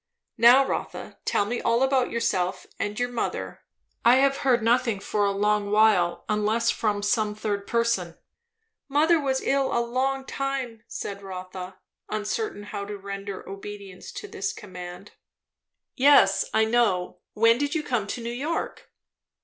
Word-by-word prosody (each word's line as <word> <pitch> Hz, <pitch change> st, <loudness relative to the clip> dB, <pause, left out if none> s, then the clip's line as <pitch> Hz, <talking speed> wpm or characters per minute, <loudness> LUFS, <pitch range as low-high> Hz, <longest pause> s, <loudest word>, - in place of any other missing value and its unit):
"Now 245 Hz, +4 st, +7 dB
Rotha, -, -, -5 dB
tell 205 Hz, -, +1 dB
me 240 Hz, +4 st, -3 dB
all 235 Hz, +2 st, +2 dB
about 265 Hz, -2 st, +2 dB
yourself 185 Hz, -5 st, -1 dB
and 205 Hz, +2 st, -2 dB
your 245 Hz, 0 st, 0 dB
mother. 240 Hz, -, -3 dB, 0.4 s
I 240 Hz, +2 st, +7 dB
have 275 Hz, +1 st, +3 dB
heard 245 Hz, -4 st, +2 dB
nothing 230 Hz, -2 st, +2 dB
for 205 Hz, +1 st, 0 dB
a -, -, +1 dB
long 205 Hz, +1 st, +1 dB
while, 210 Hz, -5 st, +3 dB
unless 215 Hz, +2 st, +1 dB
from 205 Hz, -2 st, -1 dB
some 210 Hz, 0 st, +1 dB
third 205 Hz, -2 st, -3 dB
person." 230 Hz, -8 st, 0 dB, 0.7 s
"Mother 315 Hz, +4 st, +4 dB
was 265 Hz, -2 st, 0 dB
ill 275 Hz, -1 st, +1 dB
a -, -, +1 dB
long 260 Hz, +3 st, -1 dB
time," 265 Hz, -5 st, -3 dB
said 200 Hz, 0 st, -6 dB
Rotha, 185 Hz, -1 st, -8 dB, 0.3 s
uncertain 215 Hz, -, -3 dB
how 205 Hz, 0 st, -5 dB
to 205 Hz, 0 st, -6 dB
render 200 Hz, 0 st, -7 dB
obedience 195 Hz, -1 st, -9 dB
to -, -, -7 dB
this 195 Hz, +1 st, -3 dB
command. 180 Hz, -1 st, -9 dB, 0.8 s
"Yes, 250 Hz, -9 st, +5 dB
I 220 Hz, 0 st, +3 dB
know. 220 Hz, -6 st, +1 dB
When 230 Hz, +2 st, +4 dB
did 285 Hz, +3 st, -1 dB
you 310 Hz, -, 0 dB
come 240 Hz, -7 st, -1 dB
to 235 Hz, -, -5 dB
New 235 Hz, +1 st, -4 dB
York?" 295 Hz, +7 st, -4 dB
220 Hz, 150 wpm, -25 LUFS, 200-250 Hz, 0.8 s, Now